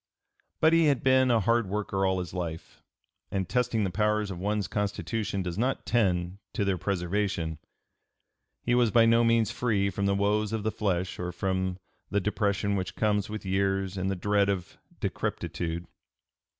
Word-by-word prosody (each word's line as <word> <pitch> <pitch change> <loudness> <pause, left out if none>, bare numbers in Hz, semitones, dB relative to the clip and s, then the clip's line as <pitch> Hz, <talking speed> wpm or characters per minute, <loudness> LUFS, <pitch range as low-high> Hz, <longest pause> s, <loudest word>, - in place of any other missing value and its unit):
But 160 +1 +5
he 165 -1 +5
had 140 -4 +2
been 130 -1 +4
a 115 -2 +4
hard 115 -1 +2
worker 100 -1 0
all 95 0 +1
his 90 -3 -4
life, 85 -3 -5 0.5
and 95 -2 -2
testing 120 -2 +1
the 95 - -1
powers 105 +1 +1
of 90 - -6
one's 105 +1 -1
constitution 105 0 -2
does 90 +1 -4
not 125 -1 0
tend 95 -5 +1
to 100 - 0
their 95 -2 0
preservation; 90 -3 -1 1.0
he 120 - +1
was 120 -2 +4
by 115 +1 +5
no 115 +1 +5
means 115 -2 +3
free 100 -5 0
from 100 +2 -1
the 100 - +2
woes 105 +2 +1
of 110 -2 -2
the 110 - 0
flesh 95 -4 -1
or 90 0 -3
from 95 0 -1 0.3
the 100 - +1
depression 100 0 0
which 95 -1 -3
comes 105 -2 +1
with 110 -1 -6
years 95 0 0
and 95 0 -1
the 95 - 0
dread 100 +2 +2
of 95 -3 -3 0.2
decrepitude. 85 0 -3
100 Hz, 175 wpm, -28 LUFS, 95-110 Hz, 1.0 s, But